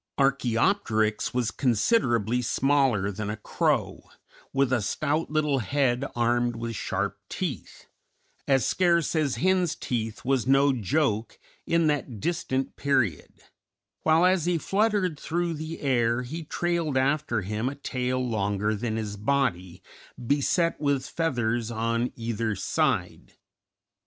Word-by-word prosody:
Archæopteryx 120 - +1
was 120 -3 0
considerably 120 - +1
smaller 130 -5 +2
than 105 +1 -4
a 105 - -3
crow, 105 - -1 0.4
with 135 -1 +1
a 120 - +2
stout 155 +9 -1
little 150 -2 +1
head 130 +1 +1
armed 120 0 +1
with 115 0 -4
sharp - - -2
teeth - - -5 0.6
(as 135 -2 +3
scarce 170 -3 +2
as 150 -4 +1
hens' 185 -2 +1
teeth 115 -2 -4
was 130 -2 +1
no 135 +1 +4
joke 115 - 0 0.3
in 165 0 +2
that 145 -7 -1
distant 135 - -2
period), 130 - -1 0.6
while 160 +2 +4
as 185 -3 +3
he 175 -1 +2
fluttered 195 -2 0
through 170 +1 -1
the 160 +1 -6
air 120 -3 +1
he 160 +7 -6
trailed 170 -2 -1
after 135 -4 +1
him 105 +6 -2
a 140 - -7
tail 130 -2 -2
longer 105 -1 0
than 110 +1 -2
his 105 -2 -3
body, 100 -7 -1 0.3
beset 145 +7 +1
with 140 -3 +1
feathers 120 -8 -1
on 115 +1 -1
either 115 -2 -2
side. 95 - -1
130 Hz, 125 wpm, -26 LUFS, 115-155 Hz, 0.6 s, no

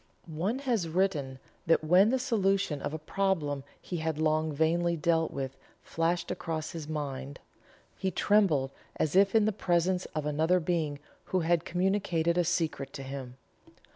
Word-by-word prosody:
One 175 +9 -2
has 225 -10 0
written 160 -7 0 0.3
that 165 -1 +4
when 180 +6 +5
the 260 - +2
solution 195 - +1
of - - -3
a 155 - -3
problem 155 -4 -1 0.2
he 180 - -5
had 160 -1 -2
long 155 0 +1
vainly 170 +3 +1
dealt 165 0 +2
with, 135 -1 -5 0.3
flashed 170 +1 -1
across 160 -2 -3
his 160 -3 -6
mind, 140 -3 -4 0.6
he 190 - -1
trembled 175 -9 +2 0.2
as 155 - -1
if 195 +2 +5
in 220 -2 +5
the 215 - +2
presence 180 -1 +1
of 155 -1 -2
another 160 +5 +2
being 160 -4 -1 0.3
who 185 - 0
had 170 0 +1
communicated 175 -2 +1
a 175 - +3
secret 160 -5 -1
to 135 - -6
him. 130 -2 -7
165 Hz, 160 wpm, -30 LUFS, 150-185 Hz, 0.6 s, when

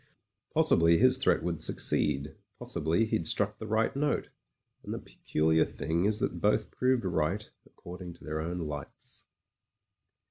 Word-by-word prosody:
Possibly 85 0 +4
his 130 +4 +4
threat 135 - +2
would 85 -3 -1
succeed; 70 -1 +2 0.2
possibly 80 +9 0
he'd 110 0 -1
struck 105 0 0
the 110 - -6
right 110 +3 0
note. 145 +1 -1 0.5
And - - -5
the - - -4
peculiar 80 +1 0
thing 85 +3 -2
is 105 +1 +1
that - - -2
both 105 +1 +1
proved 125 -4 +1
right 90 +4 -1 0.2
according 90 0 -10
to 85 - -18
their 75 0 -3
own 85 +2 -4
lights. 75 -3 -8
90 Hz, 145 wpm, -29 LUFS, 80-110 Hz, 0.5 s, Possibly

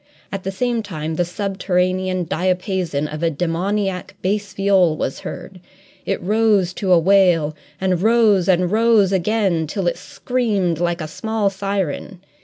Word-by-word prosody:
At 195 - -4
the 195 - -4
same 235 +3 -1
time 160 -6 -5
the 175 - +1
subterranean 185 -1 -1
diapason 180 -3 -1
of 150 +1 -7
a 165 - +2
demoniac 180 +4 -2
bass 200 +2 -1
viol 190 -5 +2
was 135 - -3
heard; 190 - -8 0.5
it - - 0
rose 205 -2 +2
to 190 -1 -2
a 180 - +7
wail, 170 -4 +3 0.2
and 185 -2 0
rose 215 -4 +3
and 180 -1 +2
rose 220 -3 +4
again 190 -4 +1
till 190 +4 -3
it 175 - 0
screamed 205 -10 -1
like 175 0 -1
a 155 - -4
small 220 +4 -1
siren. 195 -2 -3
185 Hz, 150 wpm, -20 LUFS, 175-200 Hz, 0.5 s, a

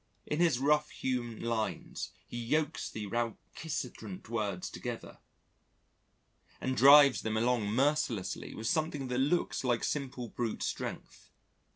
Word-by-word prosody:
In 150 - -2
his 170 -7 +4
rough 150 +3 +2
hewn 120 -3 -3
lines 115 -2 -2 0.2
he 120 - -7
yokes 150 +5 0
the 110 - -5
recalcitrant 115 - -4
words 105 -6 -2
together - - -6 1.4
and 130 0 -1
drives 140 +1 +8
them 110 0 -1
along 120 -2 +2
mercilessly 120 -7 0
with 110 - -6
something 150 -1 0
that 125 0 0
looks 150 +4 +1
like 120 -2 +1
simple 130 -4 -3
brute 115 -3 -3
strength. - - -5
125 Hz, 120 wpm, -32 LUFS, 115-145 Hz, 1.4 s, drives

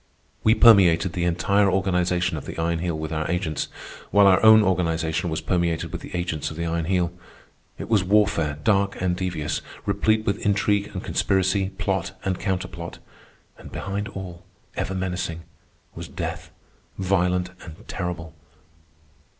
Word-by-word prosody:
We 110 +1 +5
permeated 95 -7 +6
the 85 -1 -1
entire 100 +4 +2
organization 90 -2 +1
of 75 - -6
the - - -7
Iron 85 0 0
Heel 85 -2 -2
with 80 0 -4
our 80 0 -2
agents, 90 -4 -1 0.4
while 100 0 +5
our 95 -1 +5
own 110 0 +8
organization 85 -2 0
was 80 0 -2
permeated 85 -1 -1
with - - -5
the - - -8
agents 85 -4 -2
of 80 - -9
the 85 - -2
Iron 85 0 -1
Heel. 90 -1 0 0.6
It - - -6
was 110 -4 +3
warfare 100 -7 +2
dark 100 -2 +2
and 90 -1 0
devious, 85 -5 -2 0.2
replete 110 +2 +1
with 100 - -1
intrigue 100 0 +1
and - - -4
conspiracy, 95 0 +1
plot - - -2
and 95 -1 -1
counterplot. 90 -3 -4 0.6
And - - -11
behind 100 +2 -4
all, 90 -4 -8 0.3
ever 95 - -2
menacing, 90 -3 -3 0.5
was - - -7
death, - - -5 0.5
violent 90 -1 +1
and 80 -2 -12
terrible. 85 -2 -5
90 Hz, 150 wpm, -24 LUFS, 85-95 Hz, 0.6 s, own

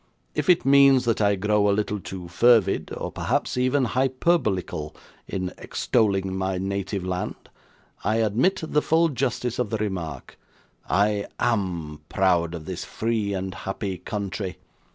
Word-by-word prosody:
If - - -2
it 175 -1 +5
means 135 -2 +6
that 115 -2 +1
I 100 -1 +3
grow 105 +1 +2
a 100 - +2
little 105 -1 -1
too 90 -2 -7
fervid, 105 +2 +3
or - - -4
perhaps - - -1
even 130 +2 +2
hyperbolical, 125 - 0 0.3
in 95 -1 -3
extolling 95 -5 0
my 95 0 -1
native 95 0 -3
land, 90 0 -4 0.5
I 110 - +1
admit 120 - +1
the 150 -1 +1
full 165 +2 +3
justice 125 -3 -2
of 125 - 0
the 110 - -1
remark. 90 -10 -5 0.5
I 100 0 +2
AM 90 -10 -1
proud 85 -3 +2
of 80 -2 -8
this 90 -1 -5
free 110 -3 -1
and 95 0 -3
happy 95 0 -4
country. 100 -2 -4
100 Hz, 145 wpm, -25 LUFS, 95-120 Hz, 0.5 s, means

